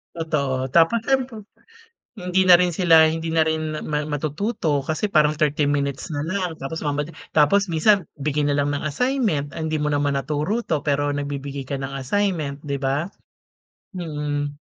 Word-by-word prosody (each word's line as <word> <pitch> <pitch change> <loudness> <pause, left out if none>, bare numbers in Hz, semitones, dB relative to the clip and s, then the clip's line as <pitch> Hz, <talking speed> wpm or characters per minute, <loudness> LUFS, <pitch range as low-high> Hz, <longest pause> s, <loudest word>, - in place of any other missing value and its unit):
Totoo. 140 -5 -1
Tapos 170 +9 +4
siyempre, 255 -4 -1 0.7
hindi 180 0 0
na 175 - +10
rin 180 -1 +1
sila 165 -2 +6
hindi 160 +1 -1
na 160 -1 +2
rin 155 -1 -2
mat 150 0 -2
matututo 155 - -1
kasi 155 +7 -2
parang 155 -6 +2
30 150 -1 +1
minutes 140 +2 -2
na 145 0 -2
lang 180 -2 -2
tapos 150 +4 -5
mamadali 145 +2 -2 0.2
tapos 175 +6 +3
minsan 195 +4 +3
bigay 150 +1 -1
na 145 - +1
lang 145 0 +1
ng 145 - -2
assignment. 160 - -1
Ah, 160 - -5
hindi 155 0 -1
mo 150 -1 -1
naman 145 -1 +1
naturo 155 +11 -2
'to, 155 -3 -1
pero 145 0 0
nagbibigay 140 -1 -5
ka 140 - -2
ng 135 0 -5
assignment, 150 0 -2
'di 140 -1 -2
ba? 135 +4 0 0.9
Mm. 145 -3 -3
150 Hz, 170 wpm, -22 LUFS, 145-170 Hz, 0.9 s, na